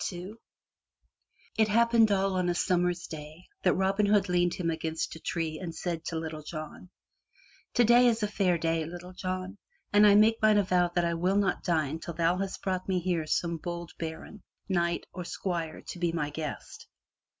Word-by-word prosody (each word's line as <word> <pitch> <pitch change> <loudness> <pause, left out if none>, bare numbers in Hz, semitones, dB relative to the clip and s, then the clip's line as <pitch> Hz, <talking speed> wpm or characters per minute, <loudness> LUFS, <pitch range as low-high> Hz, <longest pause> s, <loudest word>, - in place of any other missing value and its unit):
HI 180 +1 -7 1.3
It 220 - +5
happened 230 0 +4
all 195 -1 +2
on 180 -1 0
a 175 - 0
Summer's 175 0 +1
day 155 +2 -9 0.2
that - - +3
Robin 195 +2 +2
Hood 205 -2 +3
leaned 175 -1 +2
him 170 -2 -1
against 160 0 -3
a - - -9
tree 160 -1 -3
and 170 -3 -6
said 170 -1 -3
to 165 - -3
Little 160 -1 -4
John: 155 +3 -8 0.9
"Today 240 +1 +6
is 225 -2 +1
a - - +2
fair 190 -4 +1
day, 165 0 0
Little 175 +3 -8
John, 185 +2 -4 0.3
and 205 +1 +7
I 200 - +7
make 220 +2 +5
mine 215 -1 +5
avow 180 -3 +3
that 175 -1 +2
I 170 - 0
will 180 +4 +1
not 200 -1 +1
dine 160 -4 0
till 170 0 -7
thou 170 +2 +2
hast 195 0 -4
brought 185 0 -2
me 185 -1 +2
here 170 -3 -1
some 170 +1 0
bold 170 +1 -6
baron, 165 +6 -6 0.3
knight 170 -3 0
or 180 - -5
squire 170 -3 -4
to 180 - -6
be 170 -1 +1
my 150 -3 -2
guest. 150 -1 -6
175 Hz, 185 wpm, -29 LUFS, 165-195 Hz, 1.3 s, and